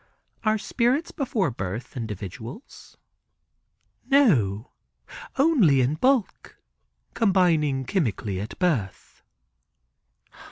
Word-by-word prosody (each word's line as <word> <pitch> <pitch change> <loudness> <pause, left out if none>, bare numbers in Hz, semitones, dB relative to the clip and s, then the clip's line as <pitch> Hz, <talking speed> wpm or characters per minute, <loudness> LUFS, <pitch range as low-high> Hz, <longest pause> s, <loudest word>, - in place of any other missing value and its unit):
"Are 215 -1 +2
spirits 245 +8 0
before 235 - -1
birth 100 +3 -6
individuals?" 110 - -8 1.1
"No, 135 - +3 0.7
only 260 - +4
in 125 +3 +1
bulk, 245 - 0 0.6
combining 165 - +2
chemically 115 - -2
at 105 - -7
birth." 140 - -2
155 Hz, 75 wpm, -25 LUFS, -, 1.1 s, only